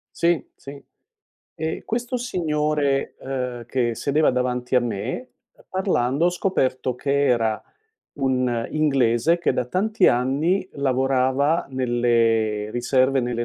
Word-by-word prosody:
Sì, 170 Hz, -3 st, +1 dB
sì. 140 Hz, +1 st, -11 dB, 0.7 s
Ehm, 160 Hz, +1 st, -3 dB
questo 245 Hz, +2 st, -2 dB
signore, 150 Hz, -, -1 dB
ehm, 125 Hz, -3 st, -4 dB
che 120 Hz, -2 st, 0 dB
sedeva 145 Hz, +6 st, +2 dB
davanti 125 Hz, 0 st, -1 dB
a -, -, +5 dB
me, 120 Hz, -, -4 dB, 0.4 s
parlando 165 Hz, -6 st, +1 dB
ho -, -, +3 dB
scoperto 130 Hz, -9 st, -1 dB
che 140 Hz, +3 st, 0 dB
era 115 Hz, -4 st, +1 dB, 0.5 s
un 125 Hz, -4 st, 0 dB
inglese 140 Hz, 0 st, +2 dB
che 170 Hz, -, +1 dB
da -, -, -1 dB
tanti 200 Hz, -, +1 dB
anni 145 Hz, +10 st, +1 dB
lavorava 135 Hz, +2 st, +1 dB
nelle 115 Hz, -4 st, +1 dB
riserve 130 Hz, +3 st, +2 dB
nelle 120 Hz, -1 st, -2 dB
130 Hz, 115 wpm, -23 LUFS, 120-155 Hz, 0.7 s, a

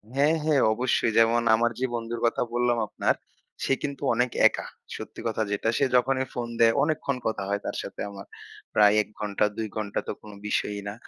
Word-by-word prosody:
হ্যাঁ, 145 Hz, +4 st, +4 dB
হ্যাঁ। 150 Hz, -4 st, +3 dB
অবশ্যই, 120 Hz, -1 st, +1 dB
যেমন 115 Hz, +1 st, +4 dB
আমার 120 Hz, +1 st, +1 dB
যে 130 Hz, -, +1 dB
বন্ধুর 115 Hz, 0 st, -4 dB
কথা 115 Hz, -, +1 dB
বললাম 120 Hz, 0 st, +2 dB
আপনার -, -, 0 dB, 0.5 s
সে -, -, +2 dB
কিন্তু 140 Hz, -1 st, -4 dB
অনেক 125 Hz, +1 st, +1 dB, 0.2 s
একা, -, -, -4 dB, 0.3 s
সত্যি -, -, -8 dB
কথা 110 Hz, -1 st, 0 dB
যেটা। 100 Hz, +2 st, 0 dB
সে 140 Hz, -, +3 dB
যখনই 130 Hz, +1 st, +2 dB
ফোন 120 Hz, -1 st, -3 dB
দেয় 115 Hz, 0 st, +6 dB
অনেকক্ষণ 150 Hz, -3 st, -1 dB
কথা 110 Hz, -3 st, -2 dB
হয় 100 Hz, 0 st, -1 dB
তার -, -, -3 dB
সাথে -, -, -7 dB
আমার। 100 Hz, -1 st, -9 dB, 0.5 s
প্রায় 105 Hz, 0 st, +6 dB
১ -, -, -7 dB
ঘন্টা 105 Hz, -1 st, 0 dB
২ 110 Hz, -1 st, -2 dB
ঘন্টা 105 Hz, -1 st, -2 dB
তো -, -, -1 dB
কোন 105 Hz, -, -11 dB, 0.2 s
বিষয়ই 105 Hz, -1 st, -1 dB
না, 100 Hz, -, -5 dB
115 Hz, 195 wpm, -26 LUFS, 105-130 Hz, 0.5 s, দেয়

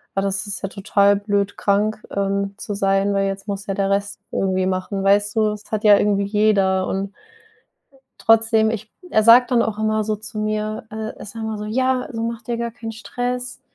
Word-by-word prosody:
„Ah, 195 Hz, -, +1 dB
das 195 Hz, +1 st, -1 dB
ist 200 Hz, -3 st, -5 dB
ja -, -, 0 dB
total 200 Hz, 0 st, +2 dB
blöd, 205 Hz, -1 st, -1 dB
krank, 210 Hz, +2 st, +1 dB
ähm, 200 Hz, 0 st, -1 dB
zu 210 Hz, -, -5 dB
sein, 195 Hz, 0 st, +1 dB
weil 195 Hz, 0 st, +1 dB
jetzt 195 Hz, +1 st, -5 dB
muss 200 Hz, 0 st, -4 dB
ja 195 Hz, -, -1 dB
der 195 Hz, 0 st, 0 dB
Rest 200 Hz, +1 st, -1 dB
irgendwie 190 Hz, -1 st, 0 dB
machen,“ 190 Hz, +1 st, -2 dB
weißt 205 Hz, +1 st, +3 dB
du? 215 Hz, -1 st, +3 dB
Es 210 Hz, 0 st, -12 dB
hat 215 Hz, -1 st, -2 dB
ja 205 Hz, -1 st, +8 dB
irgendwie 200 Hz, -1 st, +1 dB
jeder 200 Hz, -2 st, +2 dB
und 195 Hz, +1 st, -3 dB, 1.0 s
trotzdem, 225 Hz, -1 st, +4 dB
ich 220 Hz, -1 st, -6 dB, 0.2 s
er 215 Hz, -, +3 dB
sagt 240 Hz, +3 st, +7 dB
dann 240 Hz, -2 st, +4 dB
auch 220 Hz, -2 st, -2 dB
immer 215 Hz, 0 st, +1 dB
so 215 Hz, 0 st, 0 dB
zu 215 Hz, +1 st, -8 dB
mir 215 Hz, 0 st, -2 dB
äh, 220 Hz, 0 st, -5 dB
er -, -, -9 dB
sagt 220 Hz, +2 st, -7 dB
immer 220 Hz, -1 st, -3 dB
so: 210 Hz, -, -5 dB
„Ja, 255 Hz, +3 st, +1 dB
also 230 Hz, -6 st, -5 dB
macht 230 Hz, -1 st, -5 dB
dir 240 Hz, -1 st, -1 dB
gar 235 Hz, 0 st, -3 dB
keinen 225 Hz, -1 st, -7 dB
Stress, 245 Hz, +4 st, -4 dB
210 Hz, 210 wpm, -21 LUFS, 200-220 Hz, 1.0 s, ja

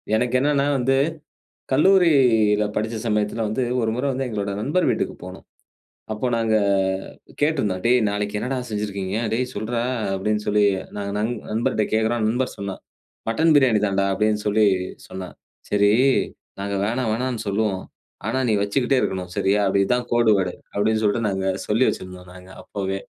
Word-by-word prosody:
எனக்கு 125 Hz, +2 st, +1 dB
என்னென்னா 140 Hz, 0 st, +2 dB
வந்து 135 Hz, +2 st, +2 dB, 0.8 s
கல்லூரில 130 Hz, -, +4 dB
படிச்ச 110 Hz, +1 st, -1 dB
சமயத்துல 105 Hz, +1 st, 0 dB
வந்து, 120 Hz, +5 st, -1 dB, 0.2 s
1 110 Hz, -1 st, 0 dB
முற 125 Hz, +3 st, -2 dB
வந்து 135 Hz, +1 st, -2 dB
எங்களோட 100 Hz, -3 st, -3 dB
நண்பர் 150 Hz, +10 st, +1 dB
வீட்டுக்கு -, -, -1 dB
போனோம். -, -, -10 dB, 0.7 s
அப்போ 115 Hz, +4 st, -2 dB
நாங்க 110 Hz, -1 st, +1 dB, 0.9 s
கேட்டிருந்தோம், 120 Hz, -, +1 dB
"டேய் 125 Hz, +1 st, +5 dB
நாளைக்கு 105 Hz, 0 st, -2 dB
என்னடா 130 Hz, +3 st, -2 dB
செஞ்சுருக்கீங்க? 100 Hz, -1 st, -3 dB, 0.2 s
டேய் 125 Hz, +2 st, -1 dB
சொல்றா" 115 Hz, +3 st, -2 dB, 0.3 s
அப்படின்னு 105 Hz, +2 st, -1 dB
சொல்லி, 105 Hz, 0 st, +3 dB, 0.3 s
நாங்க 100 Hz, -1 st, -3 dB
நண்ப 115 Hz, +2 st, -1 dB
நண்பர்ட்ட 110 Hz, -1 st, 0 dB
கேக்குறோம் 110 Hz, +1 st, +1 dB
நண்பர் 125 Hz, +3 st, -1 dB
சொன்னான். 100 Hz, -1 st, -6 dB, 0.5 s
"மட்டன் 160 Hz, +7 st, +3 dB
பிரியாணி 120 Hz, -6 st, +3 dB
தான்டா" 100 Hz, 0 st, +1 dB
அப்டின்னு 105 Hz, +1 st, 0 dB
சொல்லி 105 Hz, +1 st, +3 dB, 0.4 s
சொன்னான். 95 Hz, -1 st, -8 dB, 0.3 s
சரி, 100 Hz, 0 st, +3 dB, 0.7 s
"நாங்க 100 Hz, 0 st, -2 dB
வேணா 120 Hz, +3 st, -1 dB
வேணானு 120 Hz, -2 st, -2 dB
சொல்லுவோம். 100 Hz, -2 st, 0 dB, 0.5 s
ஆனா 130 Hz, +4 st, 0 dB
நீ 110 Hz, -, +2 dB
வைச்சுக்கிட்டே 125 Hz, +6 st, +1 dB
இருக்கணும். 90 Hz, -2 st, -2 dB
சரியா? 100 Hz, +2 st, +2 dB
அப்ப 95 Hz, -, +1 dB
இது 95 Hz, -, -1 dB
தான் 125 Hz, 0 st, -3 dB
கோடு 120 Hz, -2 st, +4 dB
வேர்டு" 90 Hz, -2 st, -1 dB, 0.2 s
அப்டின்னு 110 Hz, +2 st, +1 dB
சொல்ட்டு, 105 Hz, +2 st, +1 dB
நாங்க 95 Hz, 0 st, -2 dB, 0.2 s
சொல்லி 115 Hz, +5 st, +3 dB
வைச்சுருந்தோம் 90 Hz, -1 st, -7 dB
நாங்க 90 Hz, 0 st, -13 dB
அப்போவே. 95 Hz, -1 st, -3 dB
110 Hz, 155 wpm, -22 LUFS, 100-125 Hz, 0.9 s, டேய்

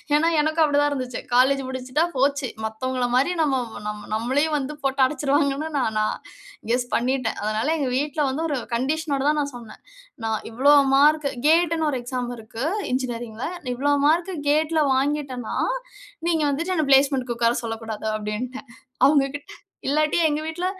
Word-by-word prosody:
ஏன்னா, 325 Hz, +2 st, +3 dB
எனக்கும் 315 Hz, +1 st, +2 dB
அப்படித்தான் 290 Hz, -1 st, +3 dB
இருந்துச்சு. 255 Hz, -3 st, -3 dB
காலேஜ் 265 Hz, +3 st, +4 dB
முடிச்சுட்டா 260 Hz, +4 st, -1 dB
போச்சு. 275 Hz, +1 st, +1 dB, 0.2 s
மத்தவங்கள 250 Hz, +3 st, -2 dB
மாரி, 270 Hz, +8 st, +3 dB
நம்ம 275 Hz, -4 st, +2 dB, 0.3 s
நம்ம 210 Hz, 0 st, -6 dB
நம்மளையும் 270 Hz, +8 st, +1 dB
வந்து 285 Hz, +2 st, -4 dB
போட்டு 270 Hz, 0 st, 0 dB
அடைச்சிருவாங்கன்னு 285 Hz, +1 st, 0 dB
நான் 220 Hz, -5 st, 0 dB
நான் 215 Hz, -, 0 dB, 0.5 s
கெஸ் 245 Hz, 0 st, +1 dB
பண்ணிட்டேன். 255 Hz, -1 st, 0 dB
அதனால, 215 Hz, +5 st, -1 dB
எங்க 270 Hz, -, 0 dB
வீட்ல 295 Hz, +2 st, -1 dB
வந்து 310 Hz, +5 st, -3 dB
ஒரு 285 Hz, -, -1 dB, 0.2 s
கண்டிஷனோட 280 Hz, +3 st, -1 dB
தான் 300 Hz, -, +1 dB
நான் 280 Hz, -2 st, -4 dB
சொன்னேன். 230 Hz, -3 st, -11 dB, 0.4 s
நான் 220 Hz, -1 st, 0 dB
இவ்வளவு 275 Hz, +3 st, +5 dB
மார்க் 300 Hz, +1 st, +4 dB, 0.2 s
கேட்ன்னு 325 Hz, -1 st, +3 dB
ஒரு 260 Hz, -, -2 dB
எக்ஸாம் 245 Hz, 0 st, -3 dB
இருக்கு, 225 Hz, +4 st, -6 dB, 0.3 s
என்ஜினியரிங்ல. 240 Hz, -3 st, -3 dB, 0.3 s
"இவ்வளவு 285 Hz, +2 st, +1 dB
மார்க் 345 Hz, +4 st, +2 dB, 0.2 s
கேட்ல 310 Hz, +1 st, +2 dB
வாங்கிட்டேன்னா, 270 Hz, -3 st, -2 dB, 0.7 s
நீங்க 325 Hz, -3 st, +2 dB
வந்துட்டு 335 Hz, +6 st, -1 dB
என்ன 305 Hz, -3 st, +1 dB
பிளேஸ்மென்ட்க்கு 265 Hz, -3 st, +3 dB
உட்கார 235 Hz, 0 st, +2 dB
சொல்லக்கூடாது." 225 Hz, -1 st, -5 dB
அப்பிடீன்ட்டேன் 220 Hz, +5 st, -5 dB, 0.4 s
அவங்ககிட்ட. 285 Hz, 0 st, +1 dB, 0.4 s
இல்லாட்டி, 305 Hz, +3 st, +2 dB
எங்க 300 Hz, 0 st, 0 dB
வீட்ல 350 Hz, +3 st, -3 dB
275 Hz, 145 wpm, -23 LUFS, 245-300 Hz, 0.7 s, இவ்வளவு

